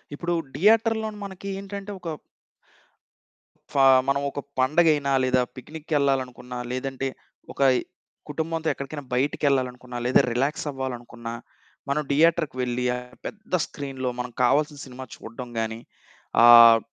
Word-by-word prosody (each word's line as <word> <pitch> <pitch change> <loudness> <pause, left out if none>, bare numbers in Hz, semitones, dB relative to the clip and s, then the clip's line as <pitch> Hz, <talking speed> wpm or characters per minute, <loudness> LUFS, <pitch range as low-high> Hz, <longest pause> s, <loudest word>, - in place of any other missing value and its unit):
ఇప్పుడు 175 +2 -2 0.2
థియేటర్‌లోని 220 +3 +2
మనకేంటంటే 195 +1 -6
ఒక 170 -2 -6 1.6
ఫా 135 - +4 0.2
మనవొక 140 +1 0 0.2
పండగైనా 145 +1 +3
లేదా 130 0 +3
పిక్నిక్కెళ్ళాలనుకున్నా, 135 -3 -2
లేదంటే 135 +1 -3 0.5
ఒక - - -6 0.7
కుటుంబంతో 160 0 -3
ఎక్కడికైనా 140 +1 -7
బయటికెళ్ళాలనుకున్నా, 125 -2 0
లేదా 125 - +5
రిలాక్సవ్వాలనుకున్నా, 125 -4 -3 0.6
మనం 150 +2 +1
థియేటర్‌కి 160 -1 +3
వెళ్ళి, 125 0 -1
ఆ - - -3 0.3
పెద్ద 215 -2 -9
స్క్రీన్‌లో 135 -2 -5
మనం 125 0 -4
కావాల్సిన 145 +4 +2
సినిమా 130 0 -9
చూడడం 120 +2 -9
గానీ, 110 0 -3 0.6
ఆహ్, 115 -1 +10
140 Hz, 100 wpm, -25 LUFS, 125-160 Hz, 1.6 s, ఆహ్